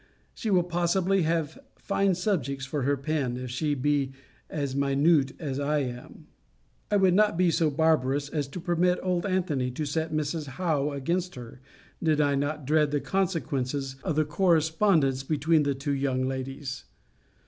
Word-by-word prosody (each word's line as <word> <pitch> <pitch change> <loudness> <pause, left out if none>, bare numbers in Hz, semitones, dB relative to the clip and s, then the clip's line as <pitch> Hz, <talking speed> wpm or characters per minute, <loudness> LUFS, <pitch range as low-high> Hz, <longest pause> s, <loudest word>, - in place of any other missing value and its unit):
She 225 - -4
will 185 -3 +4
possibly 175 +2 +1
have 160 -1 -1 0.2
fine 195 -2 +1
subjects 145 - -1
for 145 +1 -3
her 140 +2 +1
pen, 135 -3 -2
if 125 -1 -6
she 145 +4 0
be 140 0 0 0.4
as 140 -3 -3
minute 140 +1 +3
as 140 -4 -4
I 145 +1 +1
am. 125 -1 -8 0.6
I 210 - +1
would 190 -2 +4
not 210 -2 +3
be 180 -1 +3
so 160 -1 +2
barbarous 145 -2 +1
as 145 -2 -2
to 140 +6 -7
permit 180 +1 +1
old 180 0 0
Antony 170 -9 0
to 140 +5 -4
set 160 +2 -2
Mrs. 155 0 -2
Howe 155 -6 0
against 170 +6 -2
her, 125 0 -10 0.4
did 155 -3 +2
I 145 -1 +3
not 145 +1 -2
dread 150 +1 +3
the 145 0 0
consequences 140 -8 -2
of 155 - -1
the 155 0 +2
correspondence 160 -3 +2
between 155 +3 +2
the 140 -1 0
two 140 +2 -2
young 130 -2 0
ladies. 135 0 -5
150 Hz, 165 wpm, -27 LUFS, 135-170 Hz, 0.6 s, will